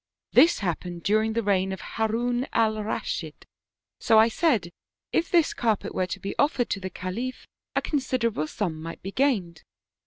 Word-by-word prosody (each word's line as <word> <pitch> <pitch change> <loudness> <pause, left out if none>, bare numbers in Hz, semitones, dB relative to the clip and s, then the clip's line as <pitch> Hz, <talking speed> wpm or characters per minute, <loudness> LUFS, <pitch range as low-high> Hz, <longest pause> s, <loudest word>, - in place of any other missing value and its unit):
This 335 - +6
happened 175 0 -3
during 215 +2 +2
the 230 0 0
reign 190 -2 +1
of 190 - -5
Harun 240 +3 -1
Alraschid, 215 -1 -1 0.5
so 220 - +4
I 220 +1 +7
said 230 - +1 0.4
if 335 - +1
this 340 -3 +3
car 225 -3 +1
pet - - -8
were 185 - 0
to - - -5
be 195 - -4
offered 285 -4 +2
to 195 - 0
the 190 0 -5
Khalif 215 +9 -5 0.3
a - - +1
considerable 245 - 0
sum 160 -3 -3
might 165 +1 -8
be 195 - -5
gained. 200 - 0
220 Hz, 165 wpm, -26 LUFS, 185-245 Hz, 0.5 s, I